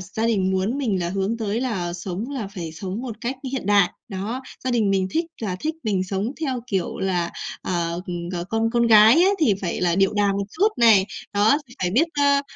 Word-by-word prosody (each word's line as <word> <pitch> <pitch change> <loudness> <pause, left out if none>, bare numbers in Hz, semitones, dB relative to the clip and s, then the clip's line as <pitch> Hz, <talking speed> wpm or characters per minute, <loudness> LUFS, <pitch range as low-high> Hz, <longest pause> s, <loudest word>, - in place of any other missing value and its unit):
gia 205 +5 -3
đình 195 -5 +1
muốn 190 +8 0
mình 215 -9 0
là 170 - -1
hướng 195 +4 -1
tới 220 +1 -1
là 190 -9 -2
sống 185 +7 -5
là 250 -8 -4
phải 175 -5 -7
sống 190 +7 -5
một 240 -4 -6
cách 255 +2 -3 0.2
hiện 265 -7 -3
đại. 200 -3 +4 0.2
Đó, 215 +6 -4 0.2
gia 255 - 0
đình 225 -5 +2
mình 190 -1 +1
thích 330 +2 0 0.2
là 185 -4 -2
thích 315 +1 -2
mình 195 -5 0
sống 195 +5 -2
theo 265 -6 -1
kiểu 195 -7 -2
là, 180 -3 0 0.3
à, 170 -2 -1 0.2
ừm, 175 -1 -4
ờ, 175 -1 -3
con 225 +4 0
con 235 -1 +2
gái 220 0 +8
ấy 390 +2 +4
thì 260 - +3
phải 175 -3 -3
là 175 -2 +2
điệu 195 +1 +3
đà 205 -1 +2
một 200 0 -1
chút 395 - +3
này, 220 -5 +5 0.3
đó, 210 +7 +4
thì 245 - -14
phải 180 - +1
biết, 270 - +3
a, 285 -1 +3
205 Hz, 230 wpm, -23 LUFS, 185-240 Hz, 0.3 s, gái